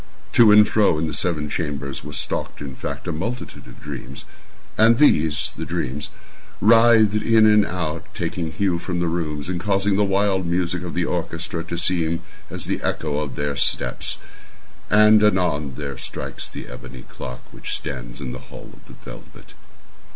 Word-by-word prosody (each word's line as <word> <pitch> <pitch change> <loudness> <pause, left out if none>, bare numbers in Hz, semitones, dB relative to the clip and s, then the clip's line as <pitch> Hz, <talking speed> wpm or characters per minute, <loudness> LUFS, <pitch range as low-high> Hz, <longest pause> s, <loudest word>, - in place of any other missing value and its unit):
To 115 -3 +7
and 105 0 +7
fro 105 -7 +3
in 80 - 0
the 80 - -3
seven 75 -1 -1
chambers 70 -3 -4
there 75 - -8
stalked, 75 - -3
in 70 -2 -6
fact, 65 - -6
a - - 0
multitude 115 +10 -5
of - - -14
dreams. 70 -2 -8 0.5
And 115 +1 +5
these—the 80 - +2
dreams—writhed 110 - +2
in 110 0 +5
and 105 -1 +5
about, 85 -5 -3
taking 80 -2 -3
hue 90 -1 0
from 90 0 -3
the 85 - +1
rooms, 80 -3 -2
and 90 -1 -2
causing 100 +1 +1
the 105 - +3
wild 95 -2 +1
music 85 0 0
of 90 -2 -6
the 85 -1 +1
orchestra 85 -1 -3
to 85 0 -4
seem 85 -1 0 0.3
as - - -4
the - - -2
echo 75 -2 -1
of 75 -3 -4
their 70 -1 -2
steps. 60 -2 0 0.7
And, 105 0 +6
anon, 90 -9 +1
there 70 -2 -6
strikes - - -5
the - - -8
ebony 60 - -10
clock 60 0 -8
which - - -5
stands - - -6
in 65 -3 -5
the - - -7
hall - - -11
of - - -19
the - - -13
velvet. - - -12
85 Hz, 170 wpm, -22 LUFS, 75-100 Hz, 0.7 s, To